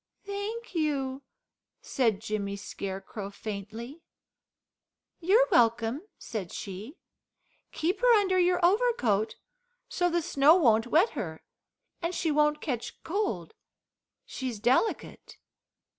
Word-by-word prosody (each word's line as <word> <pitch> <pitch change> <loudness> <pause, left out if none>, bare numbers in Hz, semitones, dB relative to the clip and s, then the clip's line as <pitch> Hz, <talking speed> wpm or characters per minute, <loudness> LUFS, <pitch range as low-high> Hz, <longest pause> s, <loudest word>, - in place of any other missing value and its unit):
"Thank 405 +3 -5
you," 280 -5 -1 0.6
said 225 -6 0
Jimmy 210 -3 -3
Scarecrow 195 0 -6
faintly. 220 - -7 1.2
"You're 420 +9 +4
welcome," 235 - +2
said 200 -7 -6
she. 205 - -7 0.7
"Keep 360 +7 -1
her - - +5
under 375 -2 +2
your 360 0 +3
overcoat, 350 - +2 0.5
so 355 0 0
the 345 -1 0
snow 300 -1 +5
won't 230 -9 +4
wet 335 - +4
her, 165 - -6 0.6
and 340 +1 -2
she 325 - 0
won't 300 0 +2
catch 245 -6 -4
cold, 325 - -2 0.7
she's 255 -5 -5
delicate." 250 - 0
275 Hz, 105 wpm, -28 LUFS, 215-360 Hz, 1.2 s, her